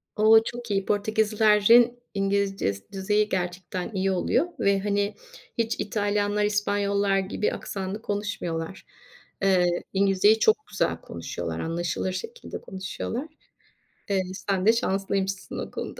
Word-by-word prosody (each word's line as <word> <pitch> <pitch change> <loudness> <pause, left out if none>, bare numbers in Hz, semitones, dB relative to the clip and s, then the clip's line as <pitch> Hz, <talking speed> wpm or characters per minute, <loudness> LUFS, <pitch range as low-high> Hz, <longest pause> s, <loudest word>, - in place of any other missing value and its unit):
O, 220 +1 +6
çok 240 -1 -6
iyi. 195 -1 0
Portekizlilerin 215 +3 +4
İngilizce 195 - 0
s 100 - -12
düzeyi 210 +2 +1
gerçekten 180 +2 -3
iyi 195 0 +1
oluyor 245 - +1
ve, 200 0 +3
hani, 205 +1 0 0.4
hiç 230 0 0
İtalyanlar, 205 -1 0
İspanyollar 205 -1 +1
gibi 195 +2 -1
aksanlı 195 +2 -5
konuşmuyorlar. 190 -5 -4 0.6
Eee, 185 -2 +4 0.3
İngilizceyi 200 +2 +4
çok 430 - +3
güzel - - -1
konuşuyorlar - - -5
anlaşılır 170 +2 -2
şekilde 460 - -7
konuşuyorlar. 195 +8 -5 0.8
Eee, 195 -1 +2 0.3
sen 195 -1 +1
de 225 - +7
şanslıymışsın 195 -3 -1
o - - -5
konuda. - - -6
200 Hz, 120 wpm, -26 LUFS, 190-215 Hz, 0.8 s, de